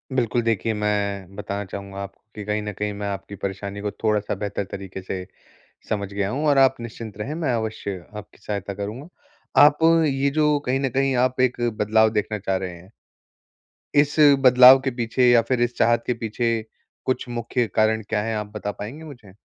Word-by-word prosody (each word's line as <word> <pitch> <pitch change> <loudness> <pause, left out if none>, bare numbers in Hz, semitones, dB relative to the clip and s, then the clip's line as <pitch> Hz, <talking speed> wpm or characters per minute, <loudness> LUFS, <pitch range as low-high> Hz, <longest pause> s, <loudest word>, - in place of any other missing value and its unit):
बिल्कुल 120 -1 +1
देखिए, 115 -1 0
मैं 100 -2 -2
बताना 100 0 -4
चाहूँगा 100 0 -8
आपको 100 0 -9
कि 105 - -6
कहीं 105 0 -1
न 105 - -4
कहीं 105 +1 -3
मैं 100 0 -5
आपकी 100 0 -5
परेशानी 100 +1 -5
को 105 -1 -2
थोड़ा-सा 105 -2 +1
बेहतर 100 0 -3
तरीक़े 95 -1 -7
से 95 0 -5 0.6
समझ 100 -2 -3
गया 100 0 -1
हूँ 145 +4 -2
और 140 -1 +4
आप 135 0 +5
निश्चिंत 115 -2 -8
रहें, 140 +8 -4
मैं 155 -6 -1
अवश्य 110 -5 -4
आपकी 105 - -10
सहायता 100 -1 -4
करूँगा। 110 - -6 0.6
आप 150 0 +2 0.3
ये 140 0 +1
जो 150 0 +2
कहीं 130 +2 +1
न 135 - 0
कहीं 135 +1 +1
आप 130 0 -4
एक 130 -1 +2 0.2
बदलाव 110 +1 +3
देखना 105 0 -1
चाह 95 -1 -1
रहे 95 -1 -4
हैं। 90 +4 -16 1.1
इस 145 0 +3 0.3
बदलाव 130 +1 +9
के 135 - +1
पीछे 120 +1 +1
या 120 -1 +6
फिर 125 -2 +1
इस 120 0 0
चाहत 115 0 +3
के 125 - +2
पीछे 115 +1 -2 0.6
कुछ 130 -1 -1
मुख्य 120 0 -1
कारण 110 0 +3
क्या 105 - 0
है? 115 -1 -2
आप 105 -1 -3
बता 105 -1 -3
पाएँगी 120 +11 -8
मुझे? 120 -11 -12
110 Hz, 190 wpm, -23 LUFS, 100-125 Hz, 1.1 s, बदलाव